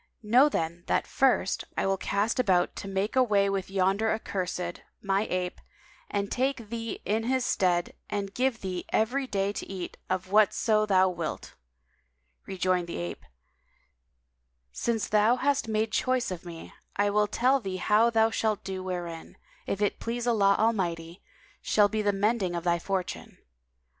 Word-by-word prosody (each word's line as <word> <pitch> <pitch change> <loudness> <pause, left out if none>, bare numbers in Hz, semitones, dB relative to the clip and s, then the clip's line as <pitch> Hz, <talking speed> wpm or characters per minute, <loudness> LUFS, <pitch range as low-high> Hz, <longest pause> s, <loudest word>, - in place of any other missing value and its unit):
Know 250 +7 +5
then 170 - -3
that - - +1
first, 260 -7 +1
I - - +1
will 195 0 +2
cast 200 +5 -1
about 185 -7 +2
to - - -6
make 195 +3 -2
away 205 -6 +3
with 195 -1 -2
yonder 195 +3 +1
accursed, 180 -5 -3 0.2
my 195 +1 0
ape, 180 -1 -2 0.5
and 200 -1 -2
take 255 -4 -1
thee 230 -1 -4
in 220 +2 0
his 260 0 +1
stead 175 -2 +1 0.2
and 200 -1 -3
give 250 -1 0
thee 185 -2 -4
every 260 +5 +1
day 200 -2 -1
to - - -6
eat 185 -2 -6
of 185 0 -2
whatso 215 +1 +3
thou 190 -2 +4
wilt." 170 -3 -5 0.9
Rejoined 185 -2 0
the 170 - -5
ape, 85 0 -5 1.5
"Since 230 -2 -1
thou 215 +3 +4
hast 280 0 0
made 220 0 0
choice 255 -3 0
of 180 -1 -6
me, 170 -2 -9 0.2
I 205 0 +2
will 210 0 +3
tell 260 +6 +2
thee 190 -5 -4
how 215 +5 +3
thou 225 -1 +3
shalt 220 -2 -1
do 190 -1 -4
wherein, 175 -3 -6 0.3
if 200 +1 -1
it 205 - 0
please 235 +1 -3
Allah 200 -4 +4
Almighty, 175 -6 -1 0.4
shall 205 -1 +3
be 215 0 -1
the 205 -1 +2
mending 200 -2 0
of 170 - -3
thy 170 -1 +2
fortune. 190 0 -4
200 Hz, 160 wpm, -28 LUFS, 185-225 Hz, 1.5 s, Know